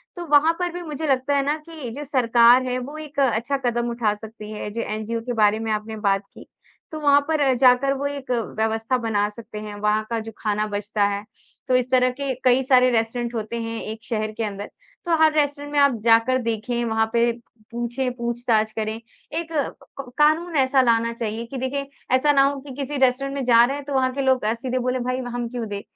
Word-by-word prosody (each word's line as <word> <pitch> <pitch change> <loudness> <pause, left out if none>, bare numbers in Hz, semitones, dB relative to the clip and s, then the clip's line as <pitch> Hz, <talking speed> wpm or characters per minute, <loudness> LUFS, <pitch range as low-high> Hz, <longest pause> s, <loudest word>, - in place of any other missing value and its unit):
तो 350 -1 -6
वहाँ 295 +2 +6
पर 355 -1 -1
भी 355 - -5
मुझे 310 0 -5
लगता 270 +1 +1
है 275 - +2
ना 295 - +1
कि 315 -7 -7
जो 295 - -5
सरकार 245 -2 +5
है 255 0 -2
वो 285 +5 -7
एक 300 -1 -7
अच्छा 255 +1 +1
कदम 240 0 0
उठा 235 -3 0
सकती 215 0 -10
है। 210 -1 -5
जो 230 - -3
एनजीओ 220 +1 -3
के 245 - -2
बारे 215 -1 +3
में 225 -1 -3
आपने 215 +1 -3
बात 200 -1 +1
की, - - -13 0.5
तो 310 - -5
वहाँ 285 -1 +5
पर 290 -4 +2
जाकर 255 +2 +4
वो 280 - -3
एक 280 -2 -6
व्यवस्था 225 +1 -1
बना 215 -3 0
सकते 215 0 -11
हैं। 210 -1 -7
वहाँ 210 +1 +2
का 230 -1 -1
जो 225 +1 -7
खाना 210 0 -1
बचता 205 0 -2
है, 200 0 -3 0.4
तो 255 - +3
इस 250 0 +1
तरह 255 -1 +4
के 275 -2 -1
कई 255 +1 +4
सारे 255 -1 +5
रेस्टोरेंट 235 +1 -1
होते 220 +1 -3
हैं 225 0 -4
एक 220 +1 -7
शहर 215 -2 -2
के 230 - -1
अंदर। 205 -1 -5 0.4
तो 340 -1 +2
हर 315 - +6
रेस्टोरेंट 290 0 0
में 290 - +3
आप 280 -1 +5
जाकर 230 +3 +4
देखें, 235 +1 -2
वहाँ 225 0 +1
पे 235 0 +3 0.4
पूछें 240 +2 -2
पूछ-ताछ 235 -2 0
करें। 215 0 -3
एक 315 +8 -8
क 275 -3 -5
कानून 320 +3 +3
ऐसा 265 0 +4
लाना 230 -1 +2
चाहिए 230 0 -4
कि 265 +3 -7
देखिए 275 +2 -3 0.3
ऐसा 290 +3 +3
ना 275 -1 +4
हो 275 0 0
की 275 - -7
किसी 280 +1 -4
रेस्टोरेंट 270 +1 +1
में 275 - -2
जा 235 -1 +6
रहे 270 +3 -2
हैं 285 - -8
तो 285 - -5
वहाँ 260 -1 +2
के 275 - -2
लोग 260 -2 +2
अ, 220 - +2
सीधे 255 +2 -3
बोले 250 +1 -1
भई 255 +1 -2
हम 240 0 -3
क्यों 240 -2 -4
दें? 205 -1 -5
245 Hz, 225 wpm, -23 LUFS, 225-275 Hz, 0.5 s, वहाँ